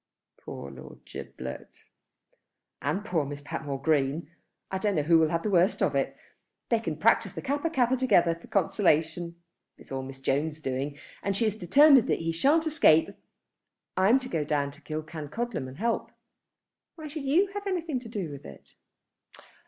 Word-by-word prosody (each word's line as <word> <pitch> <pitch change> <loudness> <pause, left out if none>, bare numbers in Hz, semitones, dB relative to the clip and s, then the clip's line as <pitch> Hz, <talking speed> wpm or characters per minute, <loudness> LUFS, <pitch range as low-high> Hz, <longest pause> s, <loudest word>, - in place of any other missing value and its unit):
"Poor 70 - -7
Lord 65 -1 -13
Giblet!" 65 0 -9 1.0
"And 165 +9 -1
poor 170 -9 0
Miss 145 +1 -6
Patmore 145 -1 -4
Green. 145 +1 0 0.4
I 190 - -1
don't 205 -1 0
know 150 - +1
which 160 - -3
will 160 -2 +6
have 165 +1 -1
the 215 - -1
worst 180 0 +3
of - - +2
it. - - -1 0.5
They 230 - +3
can 165 -9 -4
practise 225 +8 +3
the - - -6
Kappa 285 +4 -1
kappa 260 -5 +2
together 240 -10 +3
for 170 - -13
consolation. 170 -3 +1 0.4
It - - -15
is - - -19
all 135 0 -3
Mrs. 135 0 -10
Jones' 150 +3 0
doing, 140 0 -3 0.2
and 200 -1 -1
she 230 - +2
is 215 -2 0
determined 265 - +6
that - - +2
he 165 0 -2
shan't 290 - +3
escape. 290 - +4 0.9
I'm 200 +8 +4
to 255 - -6
go 165 -10 -1
down 145 -1 0
to - - -16
Killancodlem 155 - -4
and 130 - -10
help." 230 +3 -1 0.9
"Why 315 -2 -8
should 295 -1 -6
you 345 +9 +3
have 405 0 -5
anything 335 -8 -1
to 240 -2 -11
do 195 -8 -4
with 140 - -9
it?" 70 - -13
170 Hz, 175 wpm, -28 LUFS, 150-240 Hz, 1.0 s, will